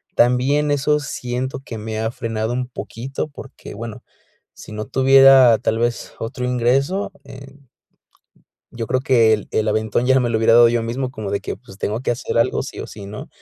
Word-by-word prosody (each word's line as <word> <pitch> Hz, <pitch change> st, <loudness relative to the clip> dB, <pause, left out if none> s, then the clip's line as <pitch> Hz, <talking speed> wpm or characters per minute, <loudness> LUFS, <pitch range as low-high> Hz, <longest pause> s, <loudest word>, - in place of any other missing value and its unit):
También 130 Hz, +5 st, +2 dB
eso 150 Hz, +1 st, +1 dB
siento 130 Hz, -2 st, -4 dB
que 125 Hz, -4 st, -8 dB
me 110 Hz, 0 st, -5 dB
ha 110 Hz, +1 st, -1 dB
frenado 115 Hz, -1 st, -3 dB
un 125 Hz, 0 st, -2 dB
poquito, 130 Hz, +3 st, -6 dB
porque 135 Hz, -5 st, -11 dB
bueno, 115 Hz, +1 st, -8 dB, 0.5 s
si -, -, -13 dB
no 110 Hz, 0 st, -5 dB
tuviera, 135 Hz, -2 st, +6 dB
tal 110 Hz, -, 0 dB
vez, 120 Hz, 0 st, -2 dB
otro 125 Hz, +2 st, -4 dB
ingreso 130 Hz, +10 st, 0 dB
en 135 Hz, 0 st, -14 dB, 1.0 s
Yo 115 Hz, -2 st, -5 dB
creo 130 Hz, +3 st, 0 dB
que 120 Hz, -4 st, +4 dB
el 105 Hz, -, -6 dB
el 110 Hz, -, 0 dB
aventón 110 Hz, +2 st, 0 dB
ya 130 Hz, 0 st, +4 dB
me 120 Hz, -, 0 dB
lo 110 Hz, -, +1 dB
hubiera 110 Hz, 0 st, +3 dB
dado 120 Hz, 0 st, +7 dB
yo 120 Hz, 0 st, 0 dB
mismo 125 Hz, +3 st, -3 dB
como 110 Hz, -6 st, -6 dB
de 100 Hz, -, -1 dB
que -, -, -5 dB
pues, 100 Hz, -3 st, -16 dB
tengo 110 Hz, +3 st, -2 dB
que 130 Hz, -, -2 dB
hacer 120 Hz, -, -4 dB
algo 115 Hz, -, +1 dB
sí -, -, -8 dB
o -, -, -6 dB
sí, 100 Hz, -2 st, -10 dB
¿no? 105 Hz, +10 st, -8 dB
120 Hz, 195 wpm, -20 LUFS, 110-135 Hz, 1.0 s, dado